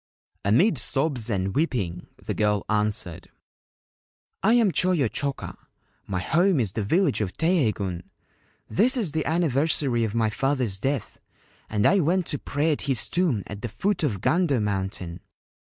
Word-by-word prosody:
Amid 125 - +3
sobs 135 -2 -1
and 95 -2 -1
weeping 100 - -1 0.2
the - - -2
girl 105 -1 0
answered: 105 -5 -1 1.1
4 205 - +3
1 - - +5
am 215 -5 +3
Choyo 170 -4 +2
Choka. 140 +5 -3 0.5
My 95 -2 -2
home 170 - +2
is 110 -6 0
the 110 - -3
village 150 - +1
of 100 -3 -2
Teiheigun. 110 - 0 0.7
This 250 +7 +2
is 205 -10 0
the 155 -1 -2
anniversary 145 -5 +1
of 110 0 -2
my 110 -2 +1
father's 125 -5 0
death, 135 +2 -3 0.5
and 105 -1 0
I 200 - +5
went 175 +2 +1
to 145 - -2
pray 150 +3 0
at 150 - -1
his 130 -4 +1
tomb 165 - +1
at 105 -1 -8
the 120 - -4
foot 195 - -1
of 110 - -1
Gando 165 -7 +2
Mountain. 95 -4 -3
130 Hz, 155 wpm, -25 LUFS, 105-165 Hz, 1.1 s, 1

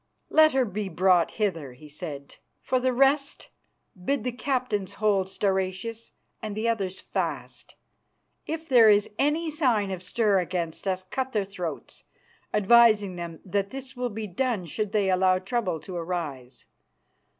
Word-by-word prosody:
"Let 310 -1 +6
her 265 -1 +3
be 205 -1 -4
brought 180 0 +3
hither," 165 - -2
he 150 +5 -14
said. 145 -1 -8 0.2
"For 255 - 0
the 255 +1 +1
rest, 275 +3 +1 0.5
bid 275 +1 0
the 250 - -1
captains 245 -6 -2
hold 200 -3 +1
Stauracius 190 +4 -2 0.3
and 215 -2 -5
the 220 +2 -1
others 195 -5 -1
fast. - - -5 0.7
If 320 +1 -4
there 235 -5 +7
is 205 0 +3
any 310 +3 +1
sign 240 -10 +1
of 185 -2 -4
stir 200 +1 +2
against 175 0 -3
us, 185 -1 -1
cut 260 +7 -4
their 210 -3 +1
throats, 180 -4 -6 0.5
advising 210 -2 +5
them 170 -2 -7
that 200 +1 -1
this 270 +2 -8
will 245 0 -2
be 220 0 -5
done 210 0 -1
should 205 +5 -3
they 205 -3 +2
allow 185 0 +3
trouble 190 -3 -2
to 185 - -8
arise. 160 -8 -5
205 Hz, 150 wpm, -26 LUFS, 185-245 Hz, 0.7 s, there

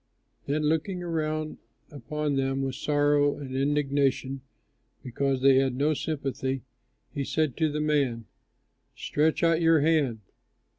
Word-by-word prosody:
Then 150 +2 0
looking 160 +4 0
around 155 -2 -2 0.3
upon 150 +2 -3
them 135 0 0
with 135 -1 -2
sorrow 145 0 +2
and 130 -2 -7
indignation 135 -1 0 0.6
because 130 +1 -1
they 135 -1 +6
had 135 -2 +2
no 145 +4 +2
sympathy, 135 -3 -3 0.5
he 140 - -2
said 145 0 -1
to 160 -2 +1
the 150 +1 -2
man, 140 -7 0 0.7
"Stretch 155 +3 0
out 165 0 +3
your 165 -2 +4
hand." 145 -8 +1
145 Hz, 130 wpm, -27 LUFS, 135-155 Hz, 0.7 s, they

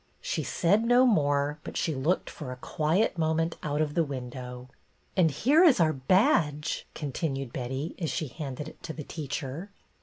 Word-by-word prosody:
She - - -2
said 200 +5 +2
no 245 +2 +5
more, 145 - +2
but - - -6
she 165 - 0
looked 150 +7 0
for 140 -5 -7
a - - -5
quiet 165 - 0
moment 165 +1 +1
out 150 0 -1
of 150 -1 0
the 165 - +3
window. 125 -2 -6 0.3
" - - -39
And 175 -4 +4
here 275 - +4
is 315 - +6
our 160 -2 +4
badge! 150 - +2
" - - -36
continued 135 -3 -3
Betty, 130 +5 -3
as 165 -4 -1
she 155 +3 -2
handed 140 +1 -6
it - - -12
to 160 - -6
the 155 - -6
teacher. 145 +3 -5
155 Hz, 185 wpm, -28 LUFS, 135-170 Hz, 0.3 s, is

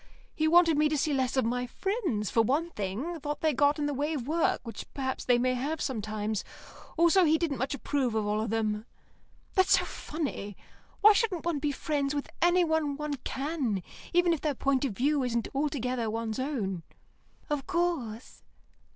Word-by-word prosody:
He 315 -1 +1
wanted 330 -2 +5
me 305 0 +4
to 305 - 0
see 295 +1 +1
less 265 -1 0
of 260 - +3
my 245 +2 -1
friends, 345 - -2
for 230 - +4
one 295 +9 +1
thing; 230 - -4
thought 295 0 -4
they 315 -1 +2
got 285 +3 +3
in 295 - -1
the 290 - -1
way 295 +3 -1
of 255 -3 -4
work, 330 +2 +2
which 230 -4 -8
perhaps 260 -1 -2
they 245 -1 +4
may 255 +1 +2
have 285 +6 -2
sometimes; 215 -3 -2 0.5
also 340 +3 +5
he 320 -1 +4
didn't 310 -5 -1
much 265 +3 -1
approve 265 -4 -1
of 215 -1 +1
all 210 +1 0
of 220 - -2
them. 215 0 -1 0.7
That's 375 -1 +5
so - - -1
funny. 275 - -5 0.4
Why 425 +1 +9
shouldn't 400 -6 0
one 335 -4 0
be 295 0 0
friends 285 0 -1
with 285 - -4
anyone 320 -4 +2
one 300 -1 -3
can, 265 - -2 0.3
even 350 0 +4
if 320 - -3
their 300 -3 0
point 275 +1 +1
of 250 - -2
view 280 +6 +1
isn't 235 -2 -1
altogether 255 -5 -1
one's 225 +1 -3
own?" 220 - -2 0.7
"Of 295 -2 -2
course." 335 -11 -2
280 Hz, 185 wpm, -29 LUFS, 235-315 Hz, 0.7 s, Why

